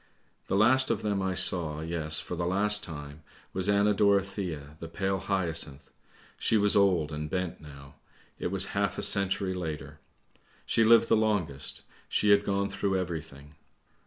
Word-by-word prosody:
" - - -41
The - - -1
last 130 +6 +4
of - - -1
them 100 -2 -1
I 95 -1 -1
saw, 85 -4 +3
yes, 80 -1 -1
for - - -5
the 85 0 -2
last 105 +3 +2
time, 75 -1 -8 0.3
was 95 +1 -1
Anna 100 +1 +3
Dorothea, 100 -7 0
the 85 - -7
pale 95 +3 -2
hyacinth. 85 -7 -2 0.5
She 110 - +2
was 105 -1 +3
old 90 -6 +3
and 75 0 -5
bent 90 -1 -3
now; 70 -2 -13 0.5
it - - -2
was 95 +1 -2
half 100 0 -1
a - - -3
century 100 -1 +1
later. 80 -5 -6 0.7
She 115 - +2
lived 115 +1 +6
the - - +4
longest, 100 -11 -2 0.3
she 105 - +2
had 100 0 +5
gone 100 0 0
through 95 0 -1
everything. 80 -5 -6
95 Hz, 165 wpm, -28 LUFS, 80-100 Hz, 0.7 s, lived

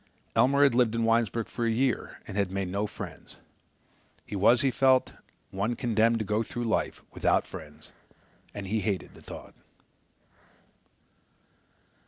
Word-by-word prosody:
Elmer 140 +2 +4
had 140 - +5
lived 120 -2 +3
in 115 0 +1
Winesburg 115 -1 +1
for 120 - -4
a 115 - +2
year 125 +2 0
and - - -7
had 100 -2 +1
made 95 -1 -2
no 100 +3 -1
friends. - - -9 0.9
He - - -6
was, 115 +5 +5
he 135 - +2
felt, 130 +1 +3 0.4
one 105 +5 -1
condemned 115 0 +2
to 110 - -2
go 105 +3 +1
through 120 +1 -4
life 115 -1 -1
without - - +2
friends 75 -1 -10 0.6
and 100 - -6
he 110 +3 0
hated 100 -3 -2
the - - -15
thought. - - -10
115 Hz, 150 wpm, -28 LUFS, 100-120 Hz, 0.9 s, had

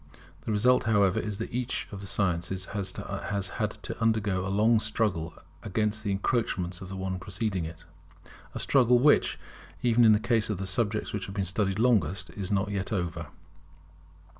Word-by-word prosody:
The - - -2
result, 125 +5 +3
however, 100 -4 +3
is 105 -2 -4
that 115 - -5
each 125 0 -2
of 100 -2 -7
the 100 - -6
sciences 90 -1 -1
has 100 -2 -2
to 100 +3 -4
undergo 105 -4 +1
a - - -2
long 110 +3 +4
struggle 105 -7 -1 0.3
against 105 +2 -1
the 105 - -2
encroachments 95 -3 -1
of 95 - -8
the 95 - -6
one 95 -1 -3
preceding 95 -2 -2
it; 80 +1 -9 0.7
a - - -3
struggle 125 -3 +4
which, 145 +4 +4 0.5
even 120 -1 +4
in 110 -1 +7
the 105 - +3
case 115 -1 +1
of 105 - -1
the 95 - -4
subjects 105 +3 -1
which 105 -2 -3
have 95 - -8
been 100 -2 0
studied 95 +1 0
longest, 100 -7 +2
is 100 -1 -5
not 100 +1 +1
yet 100 +1 -3
over. 85 -5 -2
100 Hz, 175 wpm, -28 LUFS, 95-110 Hz, 0.7 s, in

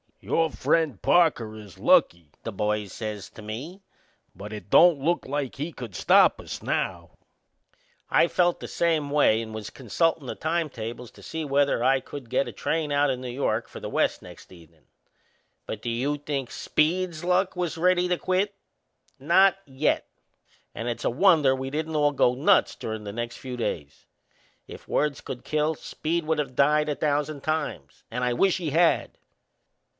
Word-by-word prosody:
"Your 165 -1 0
friend 155 -10 +1
Parker 135 -11 +3
is 105 -3 -12
lucky," 85 -4 +3
the 115 - -4
boys 105 -1 -2
says 105 -3 -5
to - - -12
me, 130 - -7 0.5
"but 100 +4 -8
it 105 -2 -9
don't 170 - +6
look 170 +5 0
like 140 -1 -3
he 150 +6 -4
could 120 - -9
stop - - +5
us - - -7
now." - - -3 0.9
I - - +4
felt 175 0 +1
the - - -7
same 160 -4 0
way 140 -6 +3
and 110 -1 -7
was 110 -1 -6
consultin' 145 - -1
the - - -4
time 165 0 -1
tables 115 0 -7
to - - -17
see 160 0 -4
whether 140 -3 +1
I 135 +1 +4
could 130 -2 -10
get 135 - +1
a - - -5
train 155 -2 -2
out 145 0 +3
o' 130 - +1
New 125 0 -7
York 120 -3 -1
for - - -10
the - - -6
West - - 0
next - - -13
evenin'. 85 -3 -18 0.8
But - - -6
do - - -2
you 130 +6 -1
think 140 -3 -4
Speed's 170 +1 0
luck 180 +2 +1
was 175 -2 -2
ready 180 +1 +3
to 180 0 +1
quit? 190 +3 0 0.6
Not 190 +7 +4
yet! 135 +2 0 0.7
And 115 - -5
it's 120 - -3
a - - +3
wonder 150 -2 +4
we 130 0 -4
didn't 155 +2 -3
all 145 -1 +3
go 125 -3 +3
nuts 170 +10 +3
durin' 110 -1 -5
the 100 - -6
next 120 +1 -4
few 125 -2 -7
days. 75 -11 -4 0.6
If - - -11
words 150 -4 0
could 125 -1 -7
kill, 155 +1 0
Speed 165 +3 -3
would 160 0 0
of 135 -4 -3
died 150 +2 +3
a 145 - 0
thousand 145 -1 -1
times. 150 - -3
And 125 +2 -3
I 125 -1 +1
wish 185 +9 +2
he 165 -5 -3
had! 165 +3 +2
145 Hz, 180 wpm, -26 LUFS, 120-160 Hz, 0.9 s, don't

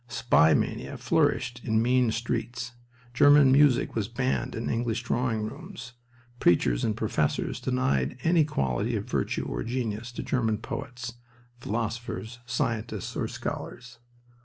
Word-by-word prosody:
Spy 120 -9 +4
mania - - -2
flourished 120 0 +1
in 110 -2 +1
mean 125 +1 +3
streets, 120 +1 -3 0.4
German 145 +1 +7
music 140 -2 +4
was 110 -3 -1
banned 125 +1 -1
in 115 - -3
English 115 0 -1
drawing 115 -3 0
rooms. 125 - -8 0.5
Preachers 65 -8 +3
and 110 -1 0
professors 105 -9 -1
denied 65 - 0
any 165 -1 +4
quality 65 - -1
of - - -2
virtue - - -1
or - - -3
genius 115 -1 -3
to - - -5
German 115 -4 0
poets, 125 0 -6 0.5
philosophers, 115 +1 -4
scientists, 115 -2 -2
or - - -1
scholars. 120 0 -6
120 Hz, 130 wpm, -27 LUFS, 110-125 Hz, 0.5 s, German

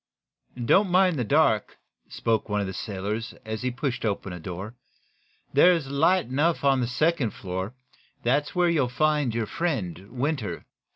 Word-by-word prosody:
"Don't 195 - +4
mind 180 -2 +4
the - - +1
dark," 115 -4 +2 0.3
spoke 110 -1 -1
one 105 0 0
of 100 - 0
the 95 - -5
sailors, 105 +4 -4
as 110 0 -4
he 125 - 0
pushed 130 0 -3
open 100 -3 -2
a 90 - -7
door. 95 +6 -6 0.8
"There's 150 -1 +4
light 165 +6 +3
enough 145 +7 0
on 135 -2 +3
the 120 - 0
second 135 0 +1
floor. 95 +5 -5 0.5
That's 140 +7 +1
where 180 -1 +3
you'll 150 -7 +2
find 150 -2 +1
your 115 -1 0
friend, 105 - -3
Winter." 130 -2 -3
125 Hz, 160 wpm, -26 LUFS, 105-155 Hz, 0.8 s, Don't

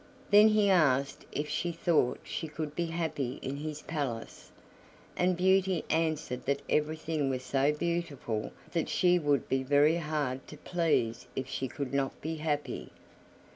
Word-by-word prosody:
Then 210 +1 +9
he 215 -1 +4
asked 140 -8 +2
if 150 +1 -2
she 175 +3 -1
thought 165 -6 +1
she 160 - -4
could 150 0 -5
be 170 -1 -1
happy 160 -6 -2
in 135 +1 -3
his 150 0 -5
palace; 140 -8 -4 0.7
and 180 0 +2
Beauty 190 -1 +3
answered 155 -5 0
that 140 0 0
everything 155 -1 0
was 130 -1 -2
so 135 +2 +2
beautiful 150 -9 -2 0.2
that 165 -2 -1
she 180 -1 +3
would 145 -3 +1
be 135 0 +1
very 145 +4 +4
hard 150 -5 -2
to 150 - -10
please 155 -9 0
if 130 - -3
she 130 0 -3
could 135 0 -5
not 135 -1 -1
be 160 +1 -4
happy. 150 -1 -2
150 Hz, 155 wpm, -30 LUFS, 135-170 Hz, 0.7 s, Then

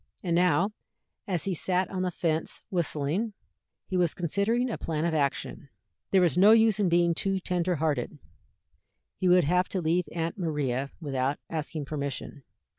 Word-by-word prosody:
And 170 -3 0
now, 180 +3 +3 0.6
as 180 -5 -1
he 195 - -1
sat 185 +2 0
on 185 -1 -2
the 185 - 0
fence 165 -2 -2
whistling, 175 +4 -1 0.5
he 185 - -4
was 175 -3 +2
considering 200 +8 0
a - - -3
plan 160 0 -2
of 170 - 0
action. 140 -1 -2 0.4
There 190 - +4
was 175 -2 +2
no 205 +4 +8
use 220 -2 +4
in 195 -3 +2
being 170 0 +3
too 195 +3 -1
tender 180 -1 0
hearted. 150 -5 -1 1.0
He 185 - +1
would 180 0 +6
have 180 +5 +2
to 190 - -2
leave 170 +1 +1
Aunt 165 +3 -3
Maria 140 -5 -1
without 135 -2 -1
asking 155 -1 -3
permission. 140 -1 -5
170 Hz, 165 wpm, -28 LUFS, 150-185 Hz, 1.0 s, no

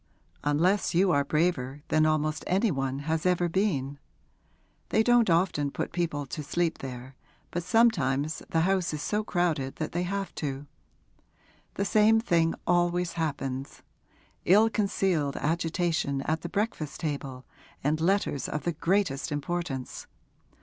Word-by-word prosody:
'Unless 170 +7 +2
you 185 +1 +4
are 140 -3 +3
braver 145 -3 -1
than 155 0 +3
almost 155 0 0
any 195 +4 +2
one 135 -1 -2
has 160 0 0
ever 180 -1 +2
been. 155 -7 -1 0.9
They 220 - +3
don't 240 -2 +4
often 165 -4 +2
put - - -4
people 165 -5 -1
to 150 +4 -5
sleep 165 +3 -1
there, 130 0 -8 0.4
but 175 - -2
sometimes 160 - +2
the 165 - +2
house 180 -2 +1
is 150 - -5
so 210 0 0
crowded 165 -9 -1
that 155 - -4
they 175 - -1
have 195 +2 -3
to. 140 -1 -3 1.1
The 200 - -1
same 215 +1 +4
thing 170 -7 +2
always 175 0 +1
happens 140 -4 -4 0.6
ill 215 +5 +5
concealed 190 -9 0
agitation 165 -3 0
at 160 +2 -1
the 170 - -5
breakfast 200 -8 -2
table 140 -4 -4 0.4
and 155 +3 +1
letters 180 -5 +1
of 150 - -3
the 175 - 0
greatest 165 -4 0
importance. 145 -3 -4
165 Hz, 140 wpm, -28 LUFS, 145-185 Hz, 1.1 s, ill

